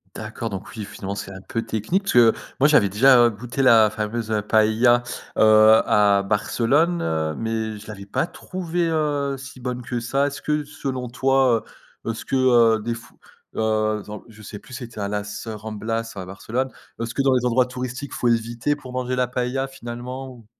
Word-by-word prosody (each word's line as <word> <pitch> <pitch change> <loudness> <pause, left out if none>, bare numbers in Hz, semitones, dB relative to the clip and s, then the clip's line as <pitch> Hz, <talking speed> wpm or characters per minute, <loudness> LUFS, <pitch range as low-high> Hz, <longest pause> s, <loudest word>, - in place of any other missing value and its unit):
D'accord 110 +1 -5
donc 95 -2 -6
oui, 105 - -4
finalement, 100 0 -6
c'est 100 -1 -6
un 95 - -9
peu 115 +4 -4
technique 110 - -1
parce 200 - -2
que, 115 -2 +6 0.3
moi, 140 - +6
j'avais 120 -11 +4
déjà 120 +2 +6
goûté 120 +5 -4
la 115 -4 +6
fameuse, 110 +1 -4
heu, 105 -1 +1
paëlla, 110 +3 +3 0.4
heu, - - +3 0.5
à 100 -1 +4
Barcelone, 125 - +1
heu, 80 -1 -1
mais 110 0 -3
je 105 - -13
l'avais 105 -2 -8
pas 100 +10 -1
trouvée, 175 -1 -3
heu, 145 -3 0
si 135 0 -10
bonne 125 0 -4
que 120 0 -4
ça. 135 +5 +1
Est-ce 140 -1 -6
que, 150 0 0
selon 135 -4 -4
toi, 130 -2 +2 0.4
heu, - - -2
est-ce 115 - -6
que, - - 0
heu, 120 -4 +4
des 120 +2 -2
f 115 0 -12 0.5
heu, 110 -1 +1
attends, 105 +1 -9
je 110 -1 -15
sais 105 0 -8
plus 130 - -13
c'était 120 -3 -7
à 100 - -2
Las, 105 +1 -4
heu, 110 - -4
Ramblas 110 +2 -4
ou - - -9
à 95 - -6
Barcelone, 115 +7 -3 0.3
est-ce 115 +1 -4
que 140 - +1
dans 135 -1 +3
les 125 -1 +2
endroits 125 +1 +3
touristiques, 125 +2 -6
il - - -5
faut 120 - +1
éviter 115 +4 0
pour 130 -4 -11
manger 130 0 -2
la 125 -1 +1
paëlla 125 +2 -1
finalement, 125 0 -7
ou? 120 -4 -13
120 Hz, 205 wpm, -23 LUFS, 110-130 Hz, 0.5 s, que